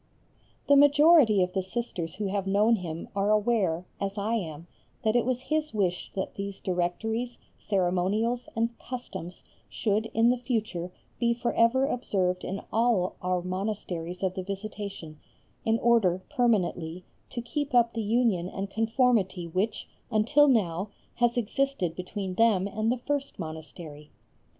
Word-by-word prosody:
The 285 - +6
majority 290 - +6
of 180 0 -3
the 190 - +1
Sisters 185 -4 -4
who 210 - -3
have 195 0 -1
known 210 +4 +4
him 170 -3 -6
are 200 +1 +1
aware, 210 -6 +2
as 200 +1 -3
I 210 +3 -1
am, 165 -7 -3 0.4
that 220 +1 +2
it 240 0 +2
was 255 -1 0
his 305 -1 -2
wish 180 -4 -1
that 190 - -3
these 200 0 -5
Directories, 220 +7 -2 0.2
Ceremonials, 200 +5 0
and 230 +1 0
Customs 245 -8 -7 0.3
should, 215 +1 0
in 225 +2 +3
the 250 - -1
future, 215 -8 -2 0.3
be 235 -1 +2
for 240 0 -1
ever 245 +4 +4
observed 190 -9 -1
in 195 +2 -4
all 225 -5 +2
our 180 -1 0
monasteries 185 -2 -4
of 185 -1 +1
the 190 - -4
Visitation, 195 -5 -6 0.5
in 225 0 +3
order, 210 -7 +3
permanently, 185 - 0 0.2
to 240 - -5
keep 275 +3 -3
up 235 -1 +4
the 230 - -2
union 215 -5 +1
and 195 +1 -5
conformity 225 -5 +1
which 185 +6 -2 0.2
until 230 +7 +4
now 200 -6 +1 0.3
has 240 0 +2
existed 240 -6 0
between 185 +1 -4
them 200 -2 +3
and 215 +3 0
the 250 - 0
first 280 +2 -3
monastery. 155 -2 -8
210 Hz, 150 wpm, -28 LUFS, 180-235 Hz, 0.5 s, The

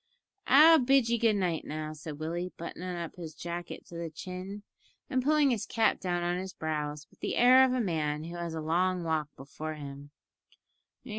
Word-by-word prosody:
"I'll 315 +4 +8
bid 265 -2 +3
ye 235 0 +1
good 225 -2 +3
night 180 -5 0
now," 155 0 -5
said 155 -1 -8
Willie, 170 +3 -3
buttoning 180 +2 -5
up 170 0 -6
his 160 -3 -8
jacket 175 +1 -6
to 170 - -12
the 170 -1 -4
chin, 185 +5 -7 0.5
and 255 - +2
pulling 295 0 +3
his 230 -4 -2
cap 225 -1 +2
down 175 -2 -1
on 175 +1 0
his 190 0 -6
brows 150 -1 -3
with - - -25
the - - -2
air 255 +2 +7
of 260 -1 +3
a 255 - +1
man 155 -6 -1
who 170 +2 -7
has 170 -1 -4
a 160 - -3
long 180 +3 +1
walk 160 -2 0
before 155 +3 -6
him. 140 -1 -9
175 Hz, 195 wpm, -30 LUFS, 155-210 Hz, 0.5 s, I'll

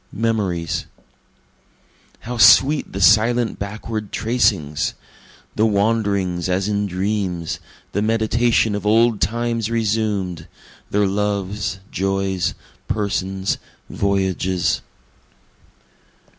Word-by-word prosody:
Memories 100 -8 -1 1.3
How 120 +1 -5
sweet 130 +6 +6
the 95 - -5
silent 110 +4 +4
backward 105 +1 -5
tracings! 100 - 0 0.6
The 110 +1 +3
wanderings 100 -4 0
as 95 +2 0
in 105 -1 0
dreams 95 -3 -2 0.3
the 100 - -1
meditation 115 +1 +2
of 100 -1 -3
old 110 +1 +3
times 115 0 -1
resumed 105 -6 -1 0.4
their 105 0 +2
loves, 100 -1 -2
joys, 95 -1 -1 0.3
persons, 95 -2 -1 0.3
voyages. 95 -2 0
105 Hz, 85 wpm, -20 LUFS, 95-110 Hz, 1.3 s, sweet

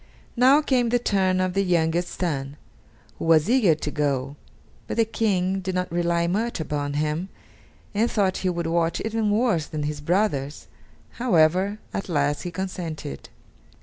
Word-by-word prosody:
Now 265 +5 +5
came 250 -5 +2
the 245 - +3
turn 190 -5 +1
of 185 -1 0
the 195 - +2
youngest 175 -1 0
son, 145 -5 -2 0.6
who - - -3
was 160 -2 +4
eager 225 -9 +4
to 150 -1 -4
go; 140 -2 -1 0.5
but - - -4
the 230 - +4
King 195 -4 0
did 190 0 -4
not 180 -1 -2
rely 170 0 +1
much 215 +6 -1
upon 145 -2 -2
him, 155 +5 -1 0.6
and 220 +3 +1
thought 195 -4 +1
he 185 - -1
would 170 -1 -2
watch 165 0 0
even 220 -1 -1
worse 205 -7 +1
than 155 -2 -4
his 150 0 -3
brothers; 150 -5 0 0.5
however, 185 -2 +3 0.2
at 195 - -4
last 145 -2 0
he 180 - -4
consented. 170 - -6
180 Hz, 160 wpm, -24 LUFS, 155-205 Hz, 0.6 s, Now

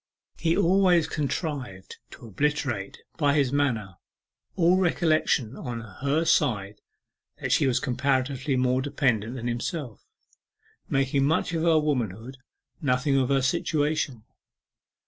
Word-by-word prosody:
He 165 0 +1
always 180 -3 +4
contrived 140 - -4
to - - -13
obliterate 120 -3 -2 0.2
by 145 -2 +3
his 140 -3 +1
manner 115 -10 -1 0.6
all 180 0 +4
recollection 155 - +1
on 120 -2 -5
her 140 - -2
side 105 -9 +1 0.6
that - - -3
she - - +3
was 125 - +2
comparatively 130 +1 0
more 130 0 +1
dependent 130 -5 0
than 120 -2 -6
himself 120 - -4 0.9
making 135 0 +1
much 160 +3 0
of 165 - -1
her 165 -1 +4
womanhood, 125 -5 -2 0.4
nothing 135 0 +1
of 130 -2 +2
her 135 -1 +2
situation. 145 -3 0
135 Hz, 120 wpm, -26 LUFS, 120-150 Hz, 0.9 s, always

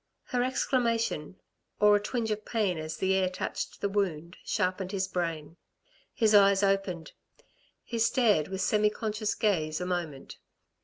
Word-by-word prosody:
Her 250 -3 -1
exclamation, 230 - 0 0.4
or 210 0 +6
a - - +3
twinge 220 +1 -2
of 215 0 -2
pain 205 -8 -1
as 155 0 -5
the 190 0 +1
air 190 -1 +2
touched 185 - -5
the 200 - +1
wound, 180 -4 -2
sharpened 185 0 -1
his 190 -2 -1
brain. 165 -3 -3 0.5
His 220 -2 +2
eyes 200 -1 +6
opened. 195 -4 0 0.7
He 235 - -4
stared 225 - +3
with 190 0 -4
semi 210 +2 +3
conscious 215 0 -2
gaze 155 -8 0
a 180 - -3
moment. 170 -6 -4
195 Hz, 150 wpm, -29 LUFS, 180-215 Hz, 0.7 s, or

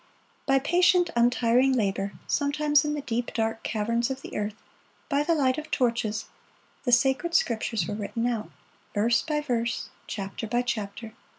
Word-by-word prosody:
By 270 - +5
patient, 350 +4 +3
untiring 245 +2 +3
labor, 200 -4 0
sometimes 295 +1 +2
in 300 0 -1
the 295 - -3
deep, 240 -3 -2
dark 225 -1 -1
caverns 230 +2 0
of 265 0 -5
the - - -8
earth, 210 0 -2 0.5
by 280 +1 +2
the 330 +3 +2
light 270 -1 +2
of 310 0 -9
torches, 230 -5 0 0.6
the 245 - +1
sacred 270 +8 +3
Scriptures 225 -4 +1
were 205 - -4
written 215 +3 -3
out, 230 -3 -1 0.5
verse 225 +3 +3
by 300 -2 -1
verse, 235 -5 -2 0.2
chapter 195 +2 -5
by 240 +3 +1
chapter. 220 -1 -4
240 Hz, 160 wpm, -27 LUFS, 220-285 Hz, 0.6 s, By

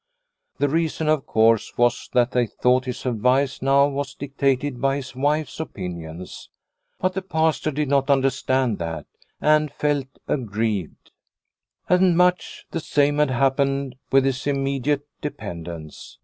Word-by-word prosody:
The 145 - +2
reason, 160 +1 -1
of 155 -2 +1
course, 110 0 +2
was 120 0 +1
that 125 0 +3
they 125 -2 +1
thought 125 +4 +1
his 125 0 -5
advice 130 +3 +1
now 140 +1 +4
was 140 -2 -4
dictated 140 -1 -1
by 135 0 +2
his 130 -2 -6
wife's 145 +4 -1
opinions. 90 - -7 0.5
But 185 0 0
the 190 - -2
Pastor 160 -4 0
did 150 0 -1
not 140 0 +1
understand 130 -3 +1
that, 85 -1 -4 0.3
and 150 -1 +3
felt 145 -2 -1 0.2
aggrieved. 110 - -2 0.8
And 180 -1 +4
much 180 0 +1
the 165 - -2
same 145 -1 +1
had 150 -2 +3
happened 135 +1 +1 0.2
with 135 0 +5
his 135 +1 -1
immediate 140 0 0 0.2
dependents. 85 - -7
135 Hz, 135 wpm, -23 LUFS, 120-145 Hz, 0.8 s, with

